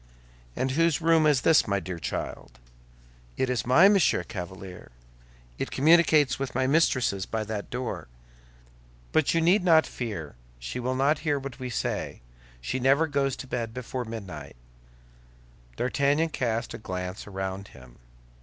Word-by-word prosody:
"And 130 - -1
whose 165 +2 +2
room 165 -1 +4
is 145 -4 +3
this, 160 +2 +4
my 100 0 +1
dear 90 -2 -6
child?" 70 - -5 0.8
"It 130 - 0
is 125 -1 -2
mine, 175 +11 +7
Monsieur 195 -4 +2
Chevalier; 90 0 -8 0.7
it - - -2
communicates 155 -3 +4
with 135 -2 -4
my 130 0 +1
mistress's 130 - +2
by 110 -1 -2
that 105 -1 -5
door. 125 0 -4 1.0
But 155 +1 +2
you 165 - +3
need 180 +4 +4
not 165 -3 +5
fear. 100 - -5 0.2
She - - -6
will 130 +1 -2
not 140 +3 +2
hear 150 -3 0
what 135 -1 -7
we 130 -1 -4
say; 115 - -3 0.4
she - - -3
never 135 +5 +4
goes 140 -3 0
to - - -9
bed 115 -2 -4
before 125 0 -4
midnight." 95 -11 -8 1.2
D'Artagnan 140 - +1
cast 115 -5 -2
a - - -7
glance 90 -2 -5
around 95 0 -5
him. 65 -1 -16
125 Hz, 150 wpm, -27 LUFS, 100-150 Hz, 1.2 s, mine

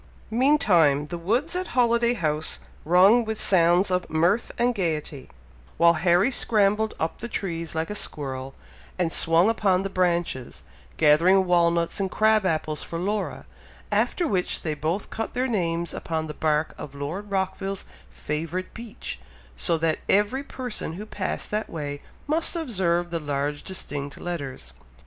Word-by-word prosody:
Meantime, 195 - +4
the 175 - -4
woods 240 - 0
at 365 -7 -4
Holiday 235 0 +3
House 155 -5 -1 0.3
rung 190 +8 +6
with 220 -1 -3
sounds 180 +1 +3
of 180 0 0
mirth 170 +8 +2
and 245 +1 +2
gaiety, 155 - -3 0.5
while 170 0 +6
Harry 175 +8 +3
scrambled 215 -2 +2
up 160 - -2
the 235 - -5
trees 170 -7 -4
like 160 +4 -2
a - - -2
squirrel, 135 -8 -4 0.4
and 175 -3 0
swung 165 +4 +3
upon 195 -4 +2
the 195 - -4
branches, 175 -8 -1 0.3
gathering 170 +5 +5
walnuts 170 -1 +2
and 195 -1 0
crab 215 0 +3
apples 155 -2 -1
for 165 - -5
Laura, 205 +4 -2 0.5
after 345 - +1
which 185 -8 -1
they 155 - -1
both 160 +7 -3
cut 225 +2 -4
their 255 +1 +1
names 170 -7 -1
upon 160 -1 -3
the 155 - -6
bark 155 0 0
of 140 - -8
Lord 165 +9 -5
Rockville's 195 0 -2 0.2
favourite 165 +5 -4
beech, 230 -2 -7 0.4
so 165 - +1
that 160 0 0
every 210 +7 +2
person 250 - -4
who 200 +5 -7
passed 200 -3 -4
that 210 +1 -2
way 145 -3 -5 0.2
must 320 +3 0
observe 180 - 0
the 170 - -1
large 145 0 -2
distinct 145 -6 -5
letters. 135 - -6
180 Hz, 150 wpm, -25 LUFS, 160-210 Hz, 0.5 s, rung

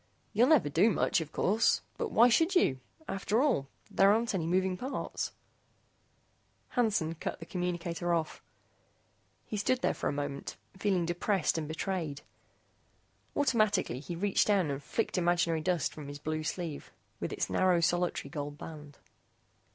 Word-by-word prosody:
You'll 230 +4 +5
never 295 - +5
do 170 +9 +4
much, 185 - +1
of 155 - -7
course, 215 +4 +2 0.2
but 465 - -1
why 235 - +6
should 325 - +3
you? 130 - +3 0.3
After 195 +3 0
all, 250 - +2 0.2
there 195 +1 +5
aren't 230 +2 +1
any 170 -4 -1
moving 185 +1 +1
parts." 260 +9 -4 1.4
Hansen 210 -10 +1
cut 165 - -5
the 165 - -8
communicator 175 -1 -2
off. 165 -2 -1 1.0
He 210 - -4
stood 255 +5 0
there - - +2
for - - -2
a - - 0
moment, 145 -1 -4 0.2
feeling 190 -2 +1
depressed 175 +1 0
and 155 - -4
betrayed. 160 -2 -3 1.1
Automatically 215 - +2
he 170 +5 -6
reached 200 +3 +2
down 190 -8 +2
and 140 0 -4
flicked 220 +3 -1
imaginary 170 -2 +2
dust 175 -2 0
from 150 -2 -8
his 145 0 -7
blue 155 +2 -3
sleeve 160 -1 -4 0.3
with - - -3
its - - -1
narrow 185 -2 +3
solitary 175 -4 0
gold 145 -1 -5
band. 150 -2 -10
175 Hz, 150 wpm, -31 LUFS, 155-205 Hz, 1.4 s, why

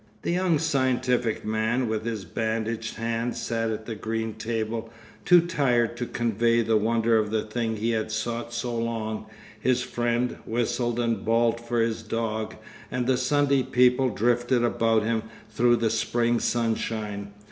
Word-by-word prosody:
_' - - -34
The - - 0
young 180 -2 +2
scientific 130 -7 +1
man, 110 +3 0
with 110 0 -2
his 110 -4 -3
bandaged 110 +3 -2
hand, 115 +1 -2
sat 115 -1 -1
at 110 0 -4
the 115 - -4
green 110 +1 -3
table, 115 +1 -3 0.4
too 175 -1 +7
tired 125 -9 +1
to 120 0 -3
convey 115 0 +1
the 110 0 +2
wonder 115 +1 +3
of 105 -1 -1
the 110 0 0
thing 110 0 -2
he 110 +2 -1
had 110 -1 -1
sought 115 +2 -3
so 120 0 -3
long, 115 -2 -3 0.3
his 125 -1 +1
friend 120 0 -1
whistled 120 +1 -1
and 115 -4 0
bawled 115 +1 +2
for 120 0 -1
his 115 0 0
dog, 110 -1 -3 0.3
and 125 -1 -1
the 130 +1 +3
Sunday 140 +2 +2
people 125 +1 +3
drifted 120 +2 +1
about 115 -2 +2
them 115 0 0 0.3
through 120 0 +4
the 115 -2 +1
spring 120 0 +1
sunshine. 110 -3 -2
115 Hz, 160 wpm, -26 LUFS, 110-120 Hz, 0.4 s, too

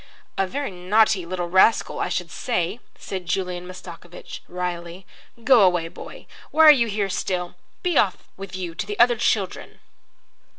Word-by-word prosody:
"A 195 - 0
very 280 +3 -4
naughty 190 +1 +2
little 180 -1 -3
rascal, 190 +6 +3
I - - -1
should - - -3
say," 220 -2 -2 0.2
said 185 -3 -6
Julian 180 -1 -2
Mastakovich, 180 -1 -10
wryly. 180 0 -5 0.4
"Go 250 -2 +6
away, 175 -3 +3
boy. - - -11 0.2
Why 320 0 +5
are 305 - +11
you 240 -5 +3
here 205 -2 -1
still? 180 -1 -3 0.3
Be 355 -4 +2
off 190 -3 0
with 195 -1 -8
you 180 -3 -5
to 190 +4 -5
the 205 0 -5
other 240 0 +6
children." 210 -4 -2
185 Hz, 160 wpm, -23 LUFS, 180-220 Hz, 0.4 s, are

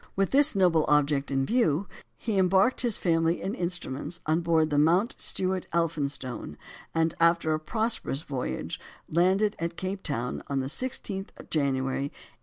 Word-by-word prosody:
With 195 0 +1
this 285 -1 +4
noble 175 -5 +4
object 145 -1 +2
in 135 -1 +1
view, 195 - +2 0.3
he 215 -4 -1
embarked 190 +6 +3
his 235 -5 +1
family 165 -1 +1
and 195 +4 -2
instruments 170 - -3
on 160 +2 +2
board 160 -2 +2
the 145 - +3
Mount 175 - +3
Stewart 185 -1 -2
Elphinstone, 145 - -2 0.4
and, 165 0 +2
after 170 -1 +3
a 155 - 0
prosperous 220 - -1
voyage, 125 - -4 0.3
landed 190 +5 +2
at 170 +1 -3
Cape 190 +1 -3
Town 125 -7 -3
on 140 -1 -1
the 130 - -2
16th 195 - -3
of - - -13
January, 135 -2 0
1834. 145 - -9
165 Hz, 160 wpm, -28 LUFS, 145-190 Hz, 0.4 s, this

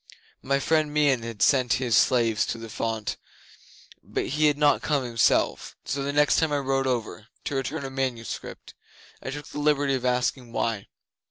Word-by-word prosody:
My 140 +1 +1
friend 155 +1 +1
Meon 145 -4 +2
had 115 -2 -3
sent 125 -3 +3
his 125 -4 +1
slaves 115 -3 +3
to - - -3
the 115 0 -9
font, 110 -1 -3 0.9
but - - -3
he 150 +2 +2
had 145 -1 +2
not 145 -1 +3
come 145 -3 0
himself, 115 -3 +1
so 140 - -2
the 140 +1 -2
next 145 0 +3
time 160 -2 +2
I 145 - +1
rode 135 -1 0
over 115 -4 -3 0.2
to 145 - -3
return 135 +1 -3
a 135 - -6
manuscript 130 -4 -5 0.5
I - - -5
took 145 +2 -7
the 150 - -6
liberty 145 -2 +2
of 130 -2 -2
asking 125 -1 -1
why. 115 -5 -2
135 Hz, 180 wpm, -26 LUFS, 115-145 Hz, 0.9 s, sent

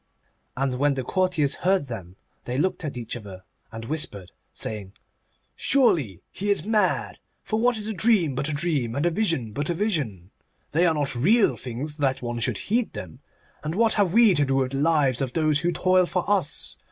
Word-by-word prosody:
And 135 0 0
when 145 0 +2
the 130 - -3
courtiers 180 -2 +1
heard 185 -4 +2
them 95 -8 -8 0.3
they 125 +1 -3
looked 185 +4 0
at 145 -5 -4
each 120 -1 -4
other 100 -5 -9 0.3
and 115 0 -7
whispered, 110 - -3 0.2
saying: 100 -3 -4 0.6
'Surely 160 - +2
he 205 +2 -3
is 200 -4 +2
mad; 215 -1 +1 0.2
for 220 - -1
what 240 0 +2
is 210 - -5
a 220 - -2
dream 200 - +3
but 140 +3 -2
a - - -2
dream, 145 -7 -1
and 145 +4 0
a 175 - +3
vision 165 - 0
but 145 +8 -3
a 170 - 0
vision? 140 - -2 0.4
They 170 +4 +3
are 160 - +2
not 145 -3 0
real 200 - +3
things 135 +5 -6
that 135 -3 0
one 120 0 -3
should 115 -2 0
heed 230 - -1
them. 80 -4 -8 0.4
And 155 +2 -3
what 225 +1 +3
have 200 -5 +2
we 225 0 +6
to 145 - +2
do 135 -1 0
with 130 -1 0
the 135 - -2
lives 145 -5 +2
of 130 -2 -2
those 155 -2 +2
who 175 +2 0
toil 185 0 +3
for 180 -1 -2
us? 195 -7 -1
150 Hz, 200 wpm, -25 LUFS, 125-185 Hz, 0.6 s, we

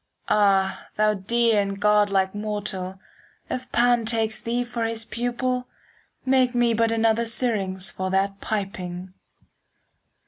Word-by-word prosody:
Ah, 195 -2 +2
thou 215 0 +3
dear 225 +2 +2
and 200 0 -4
godlike 205 -2 +3
mortal, 205 -3 -4 0.5
5 255 - -2
If 255 - -19
Pan 240 0 +3
takes 220 -1 0
thee 240 +1 -1
for 240 -1 -4
his 225 0 -2
pupil, 250 +2 -2 0.6
Make 260 -1 +3
me 240 -1 +3
but 225 0 +2
another 225 0 +2
Syrinx 200 -6 0
For 185 0 -3
that 195 +1 0
piping. 185 -3 -4
215 Hz, 130 wpm, -24 LUFS, 195-235 Hz, 0.6 s, thou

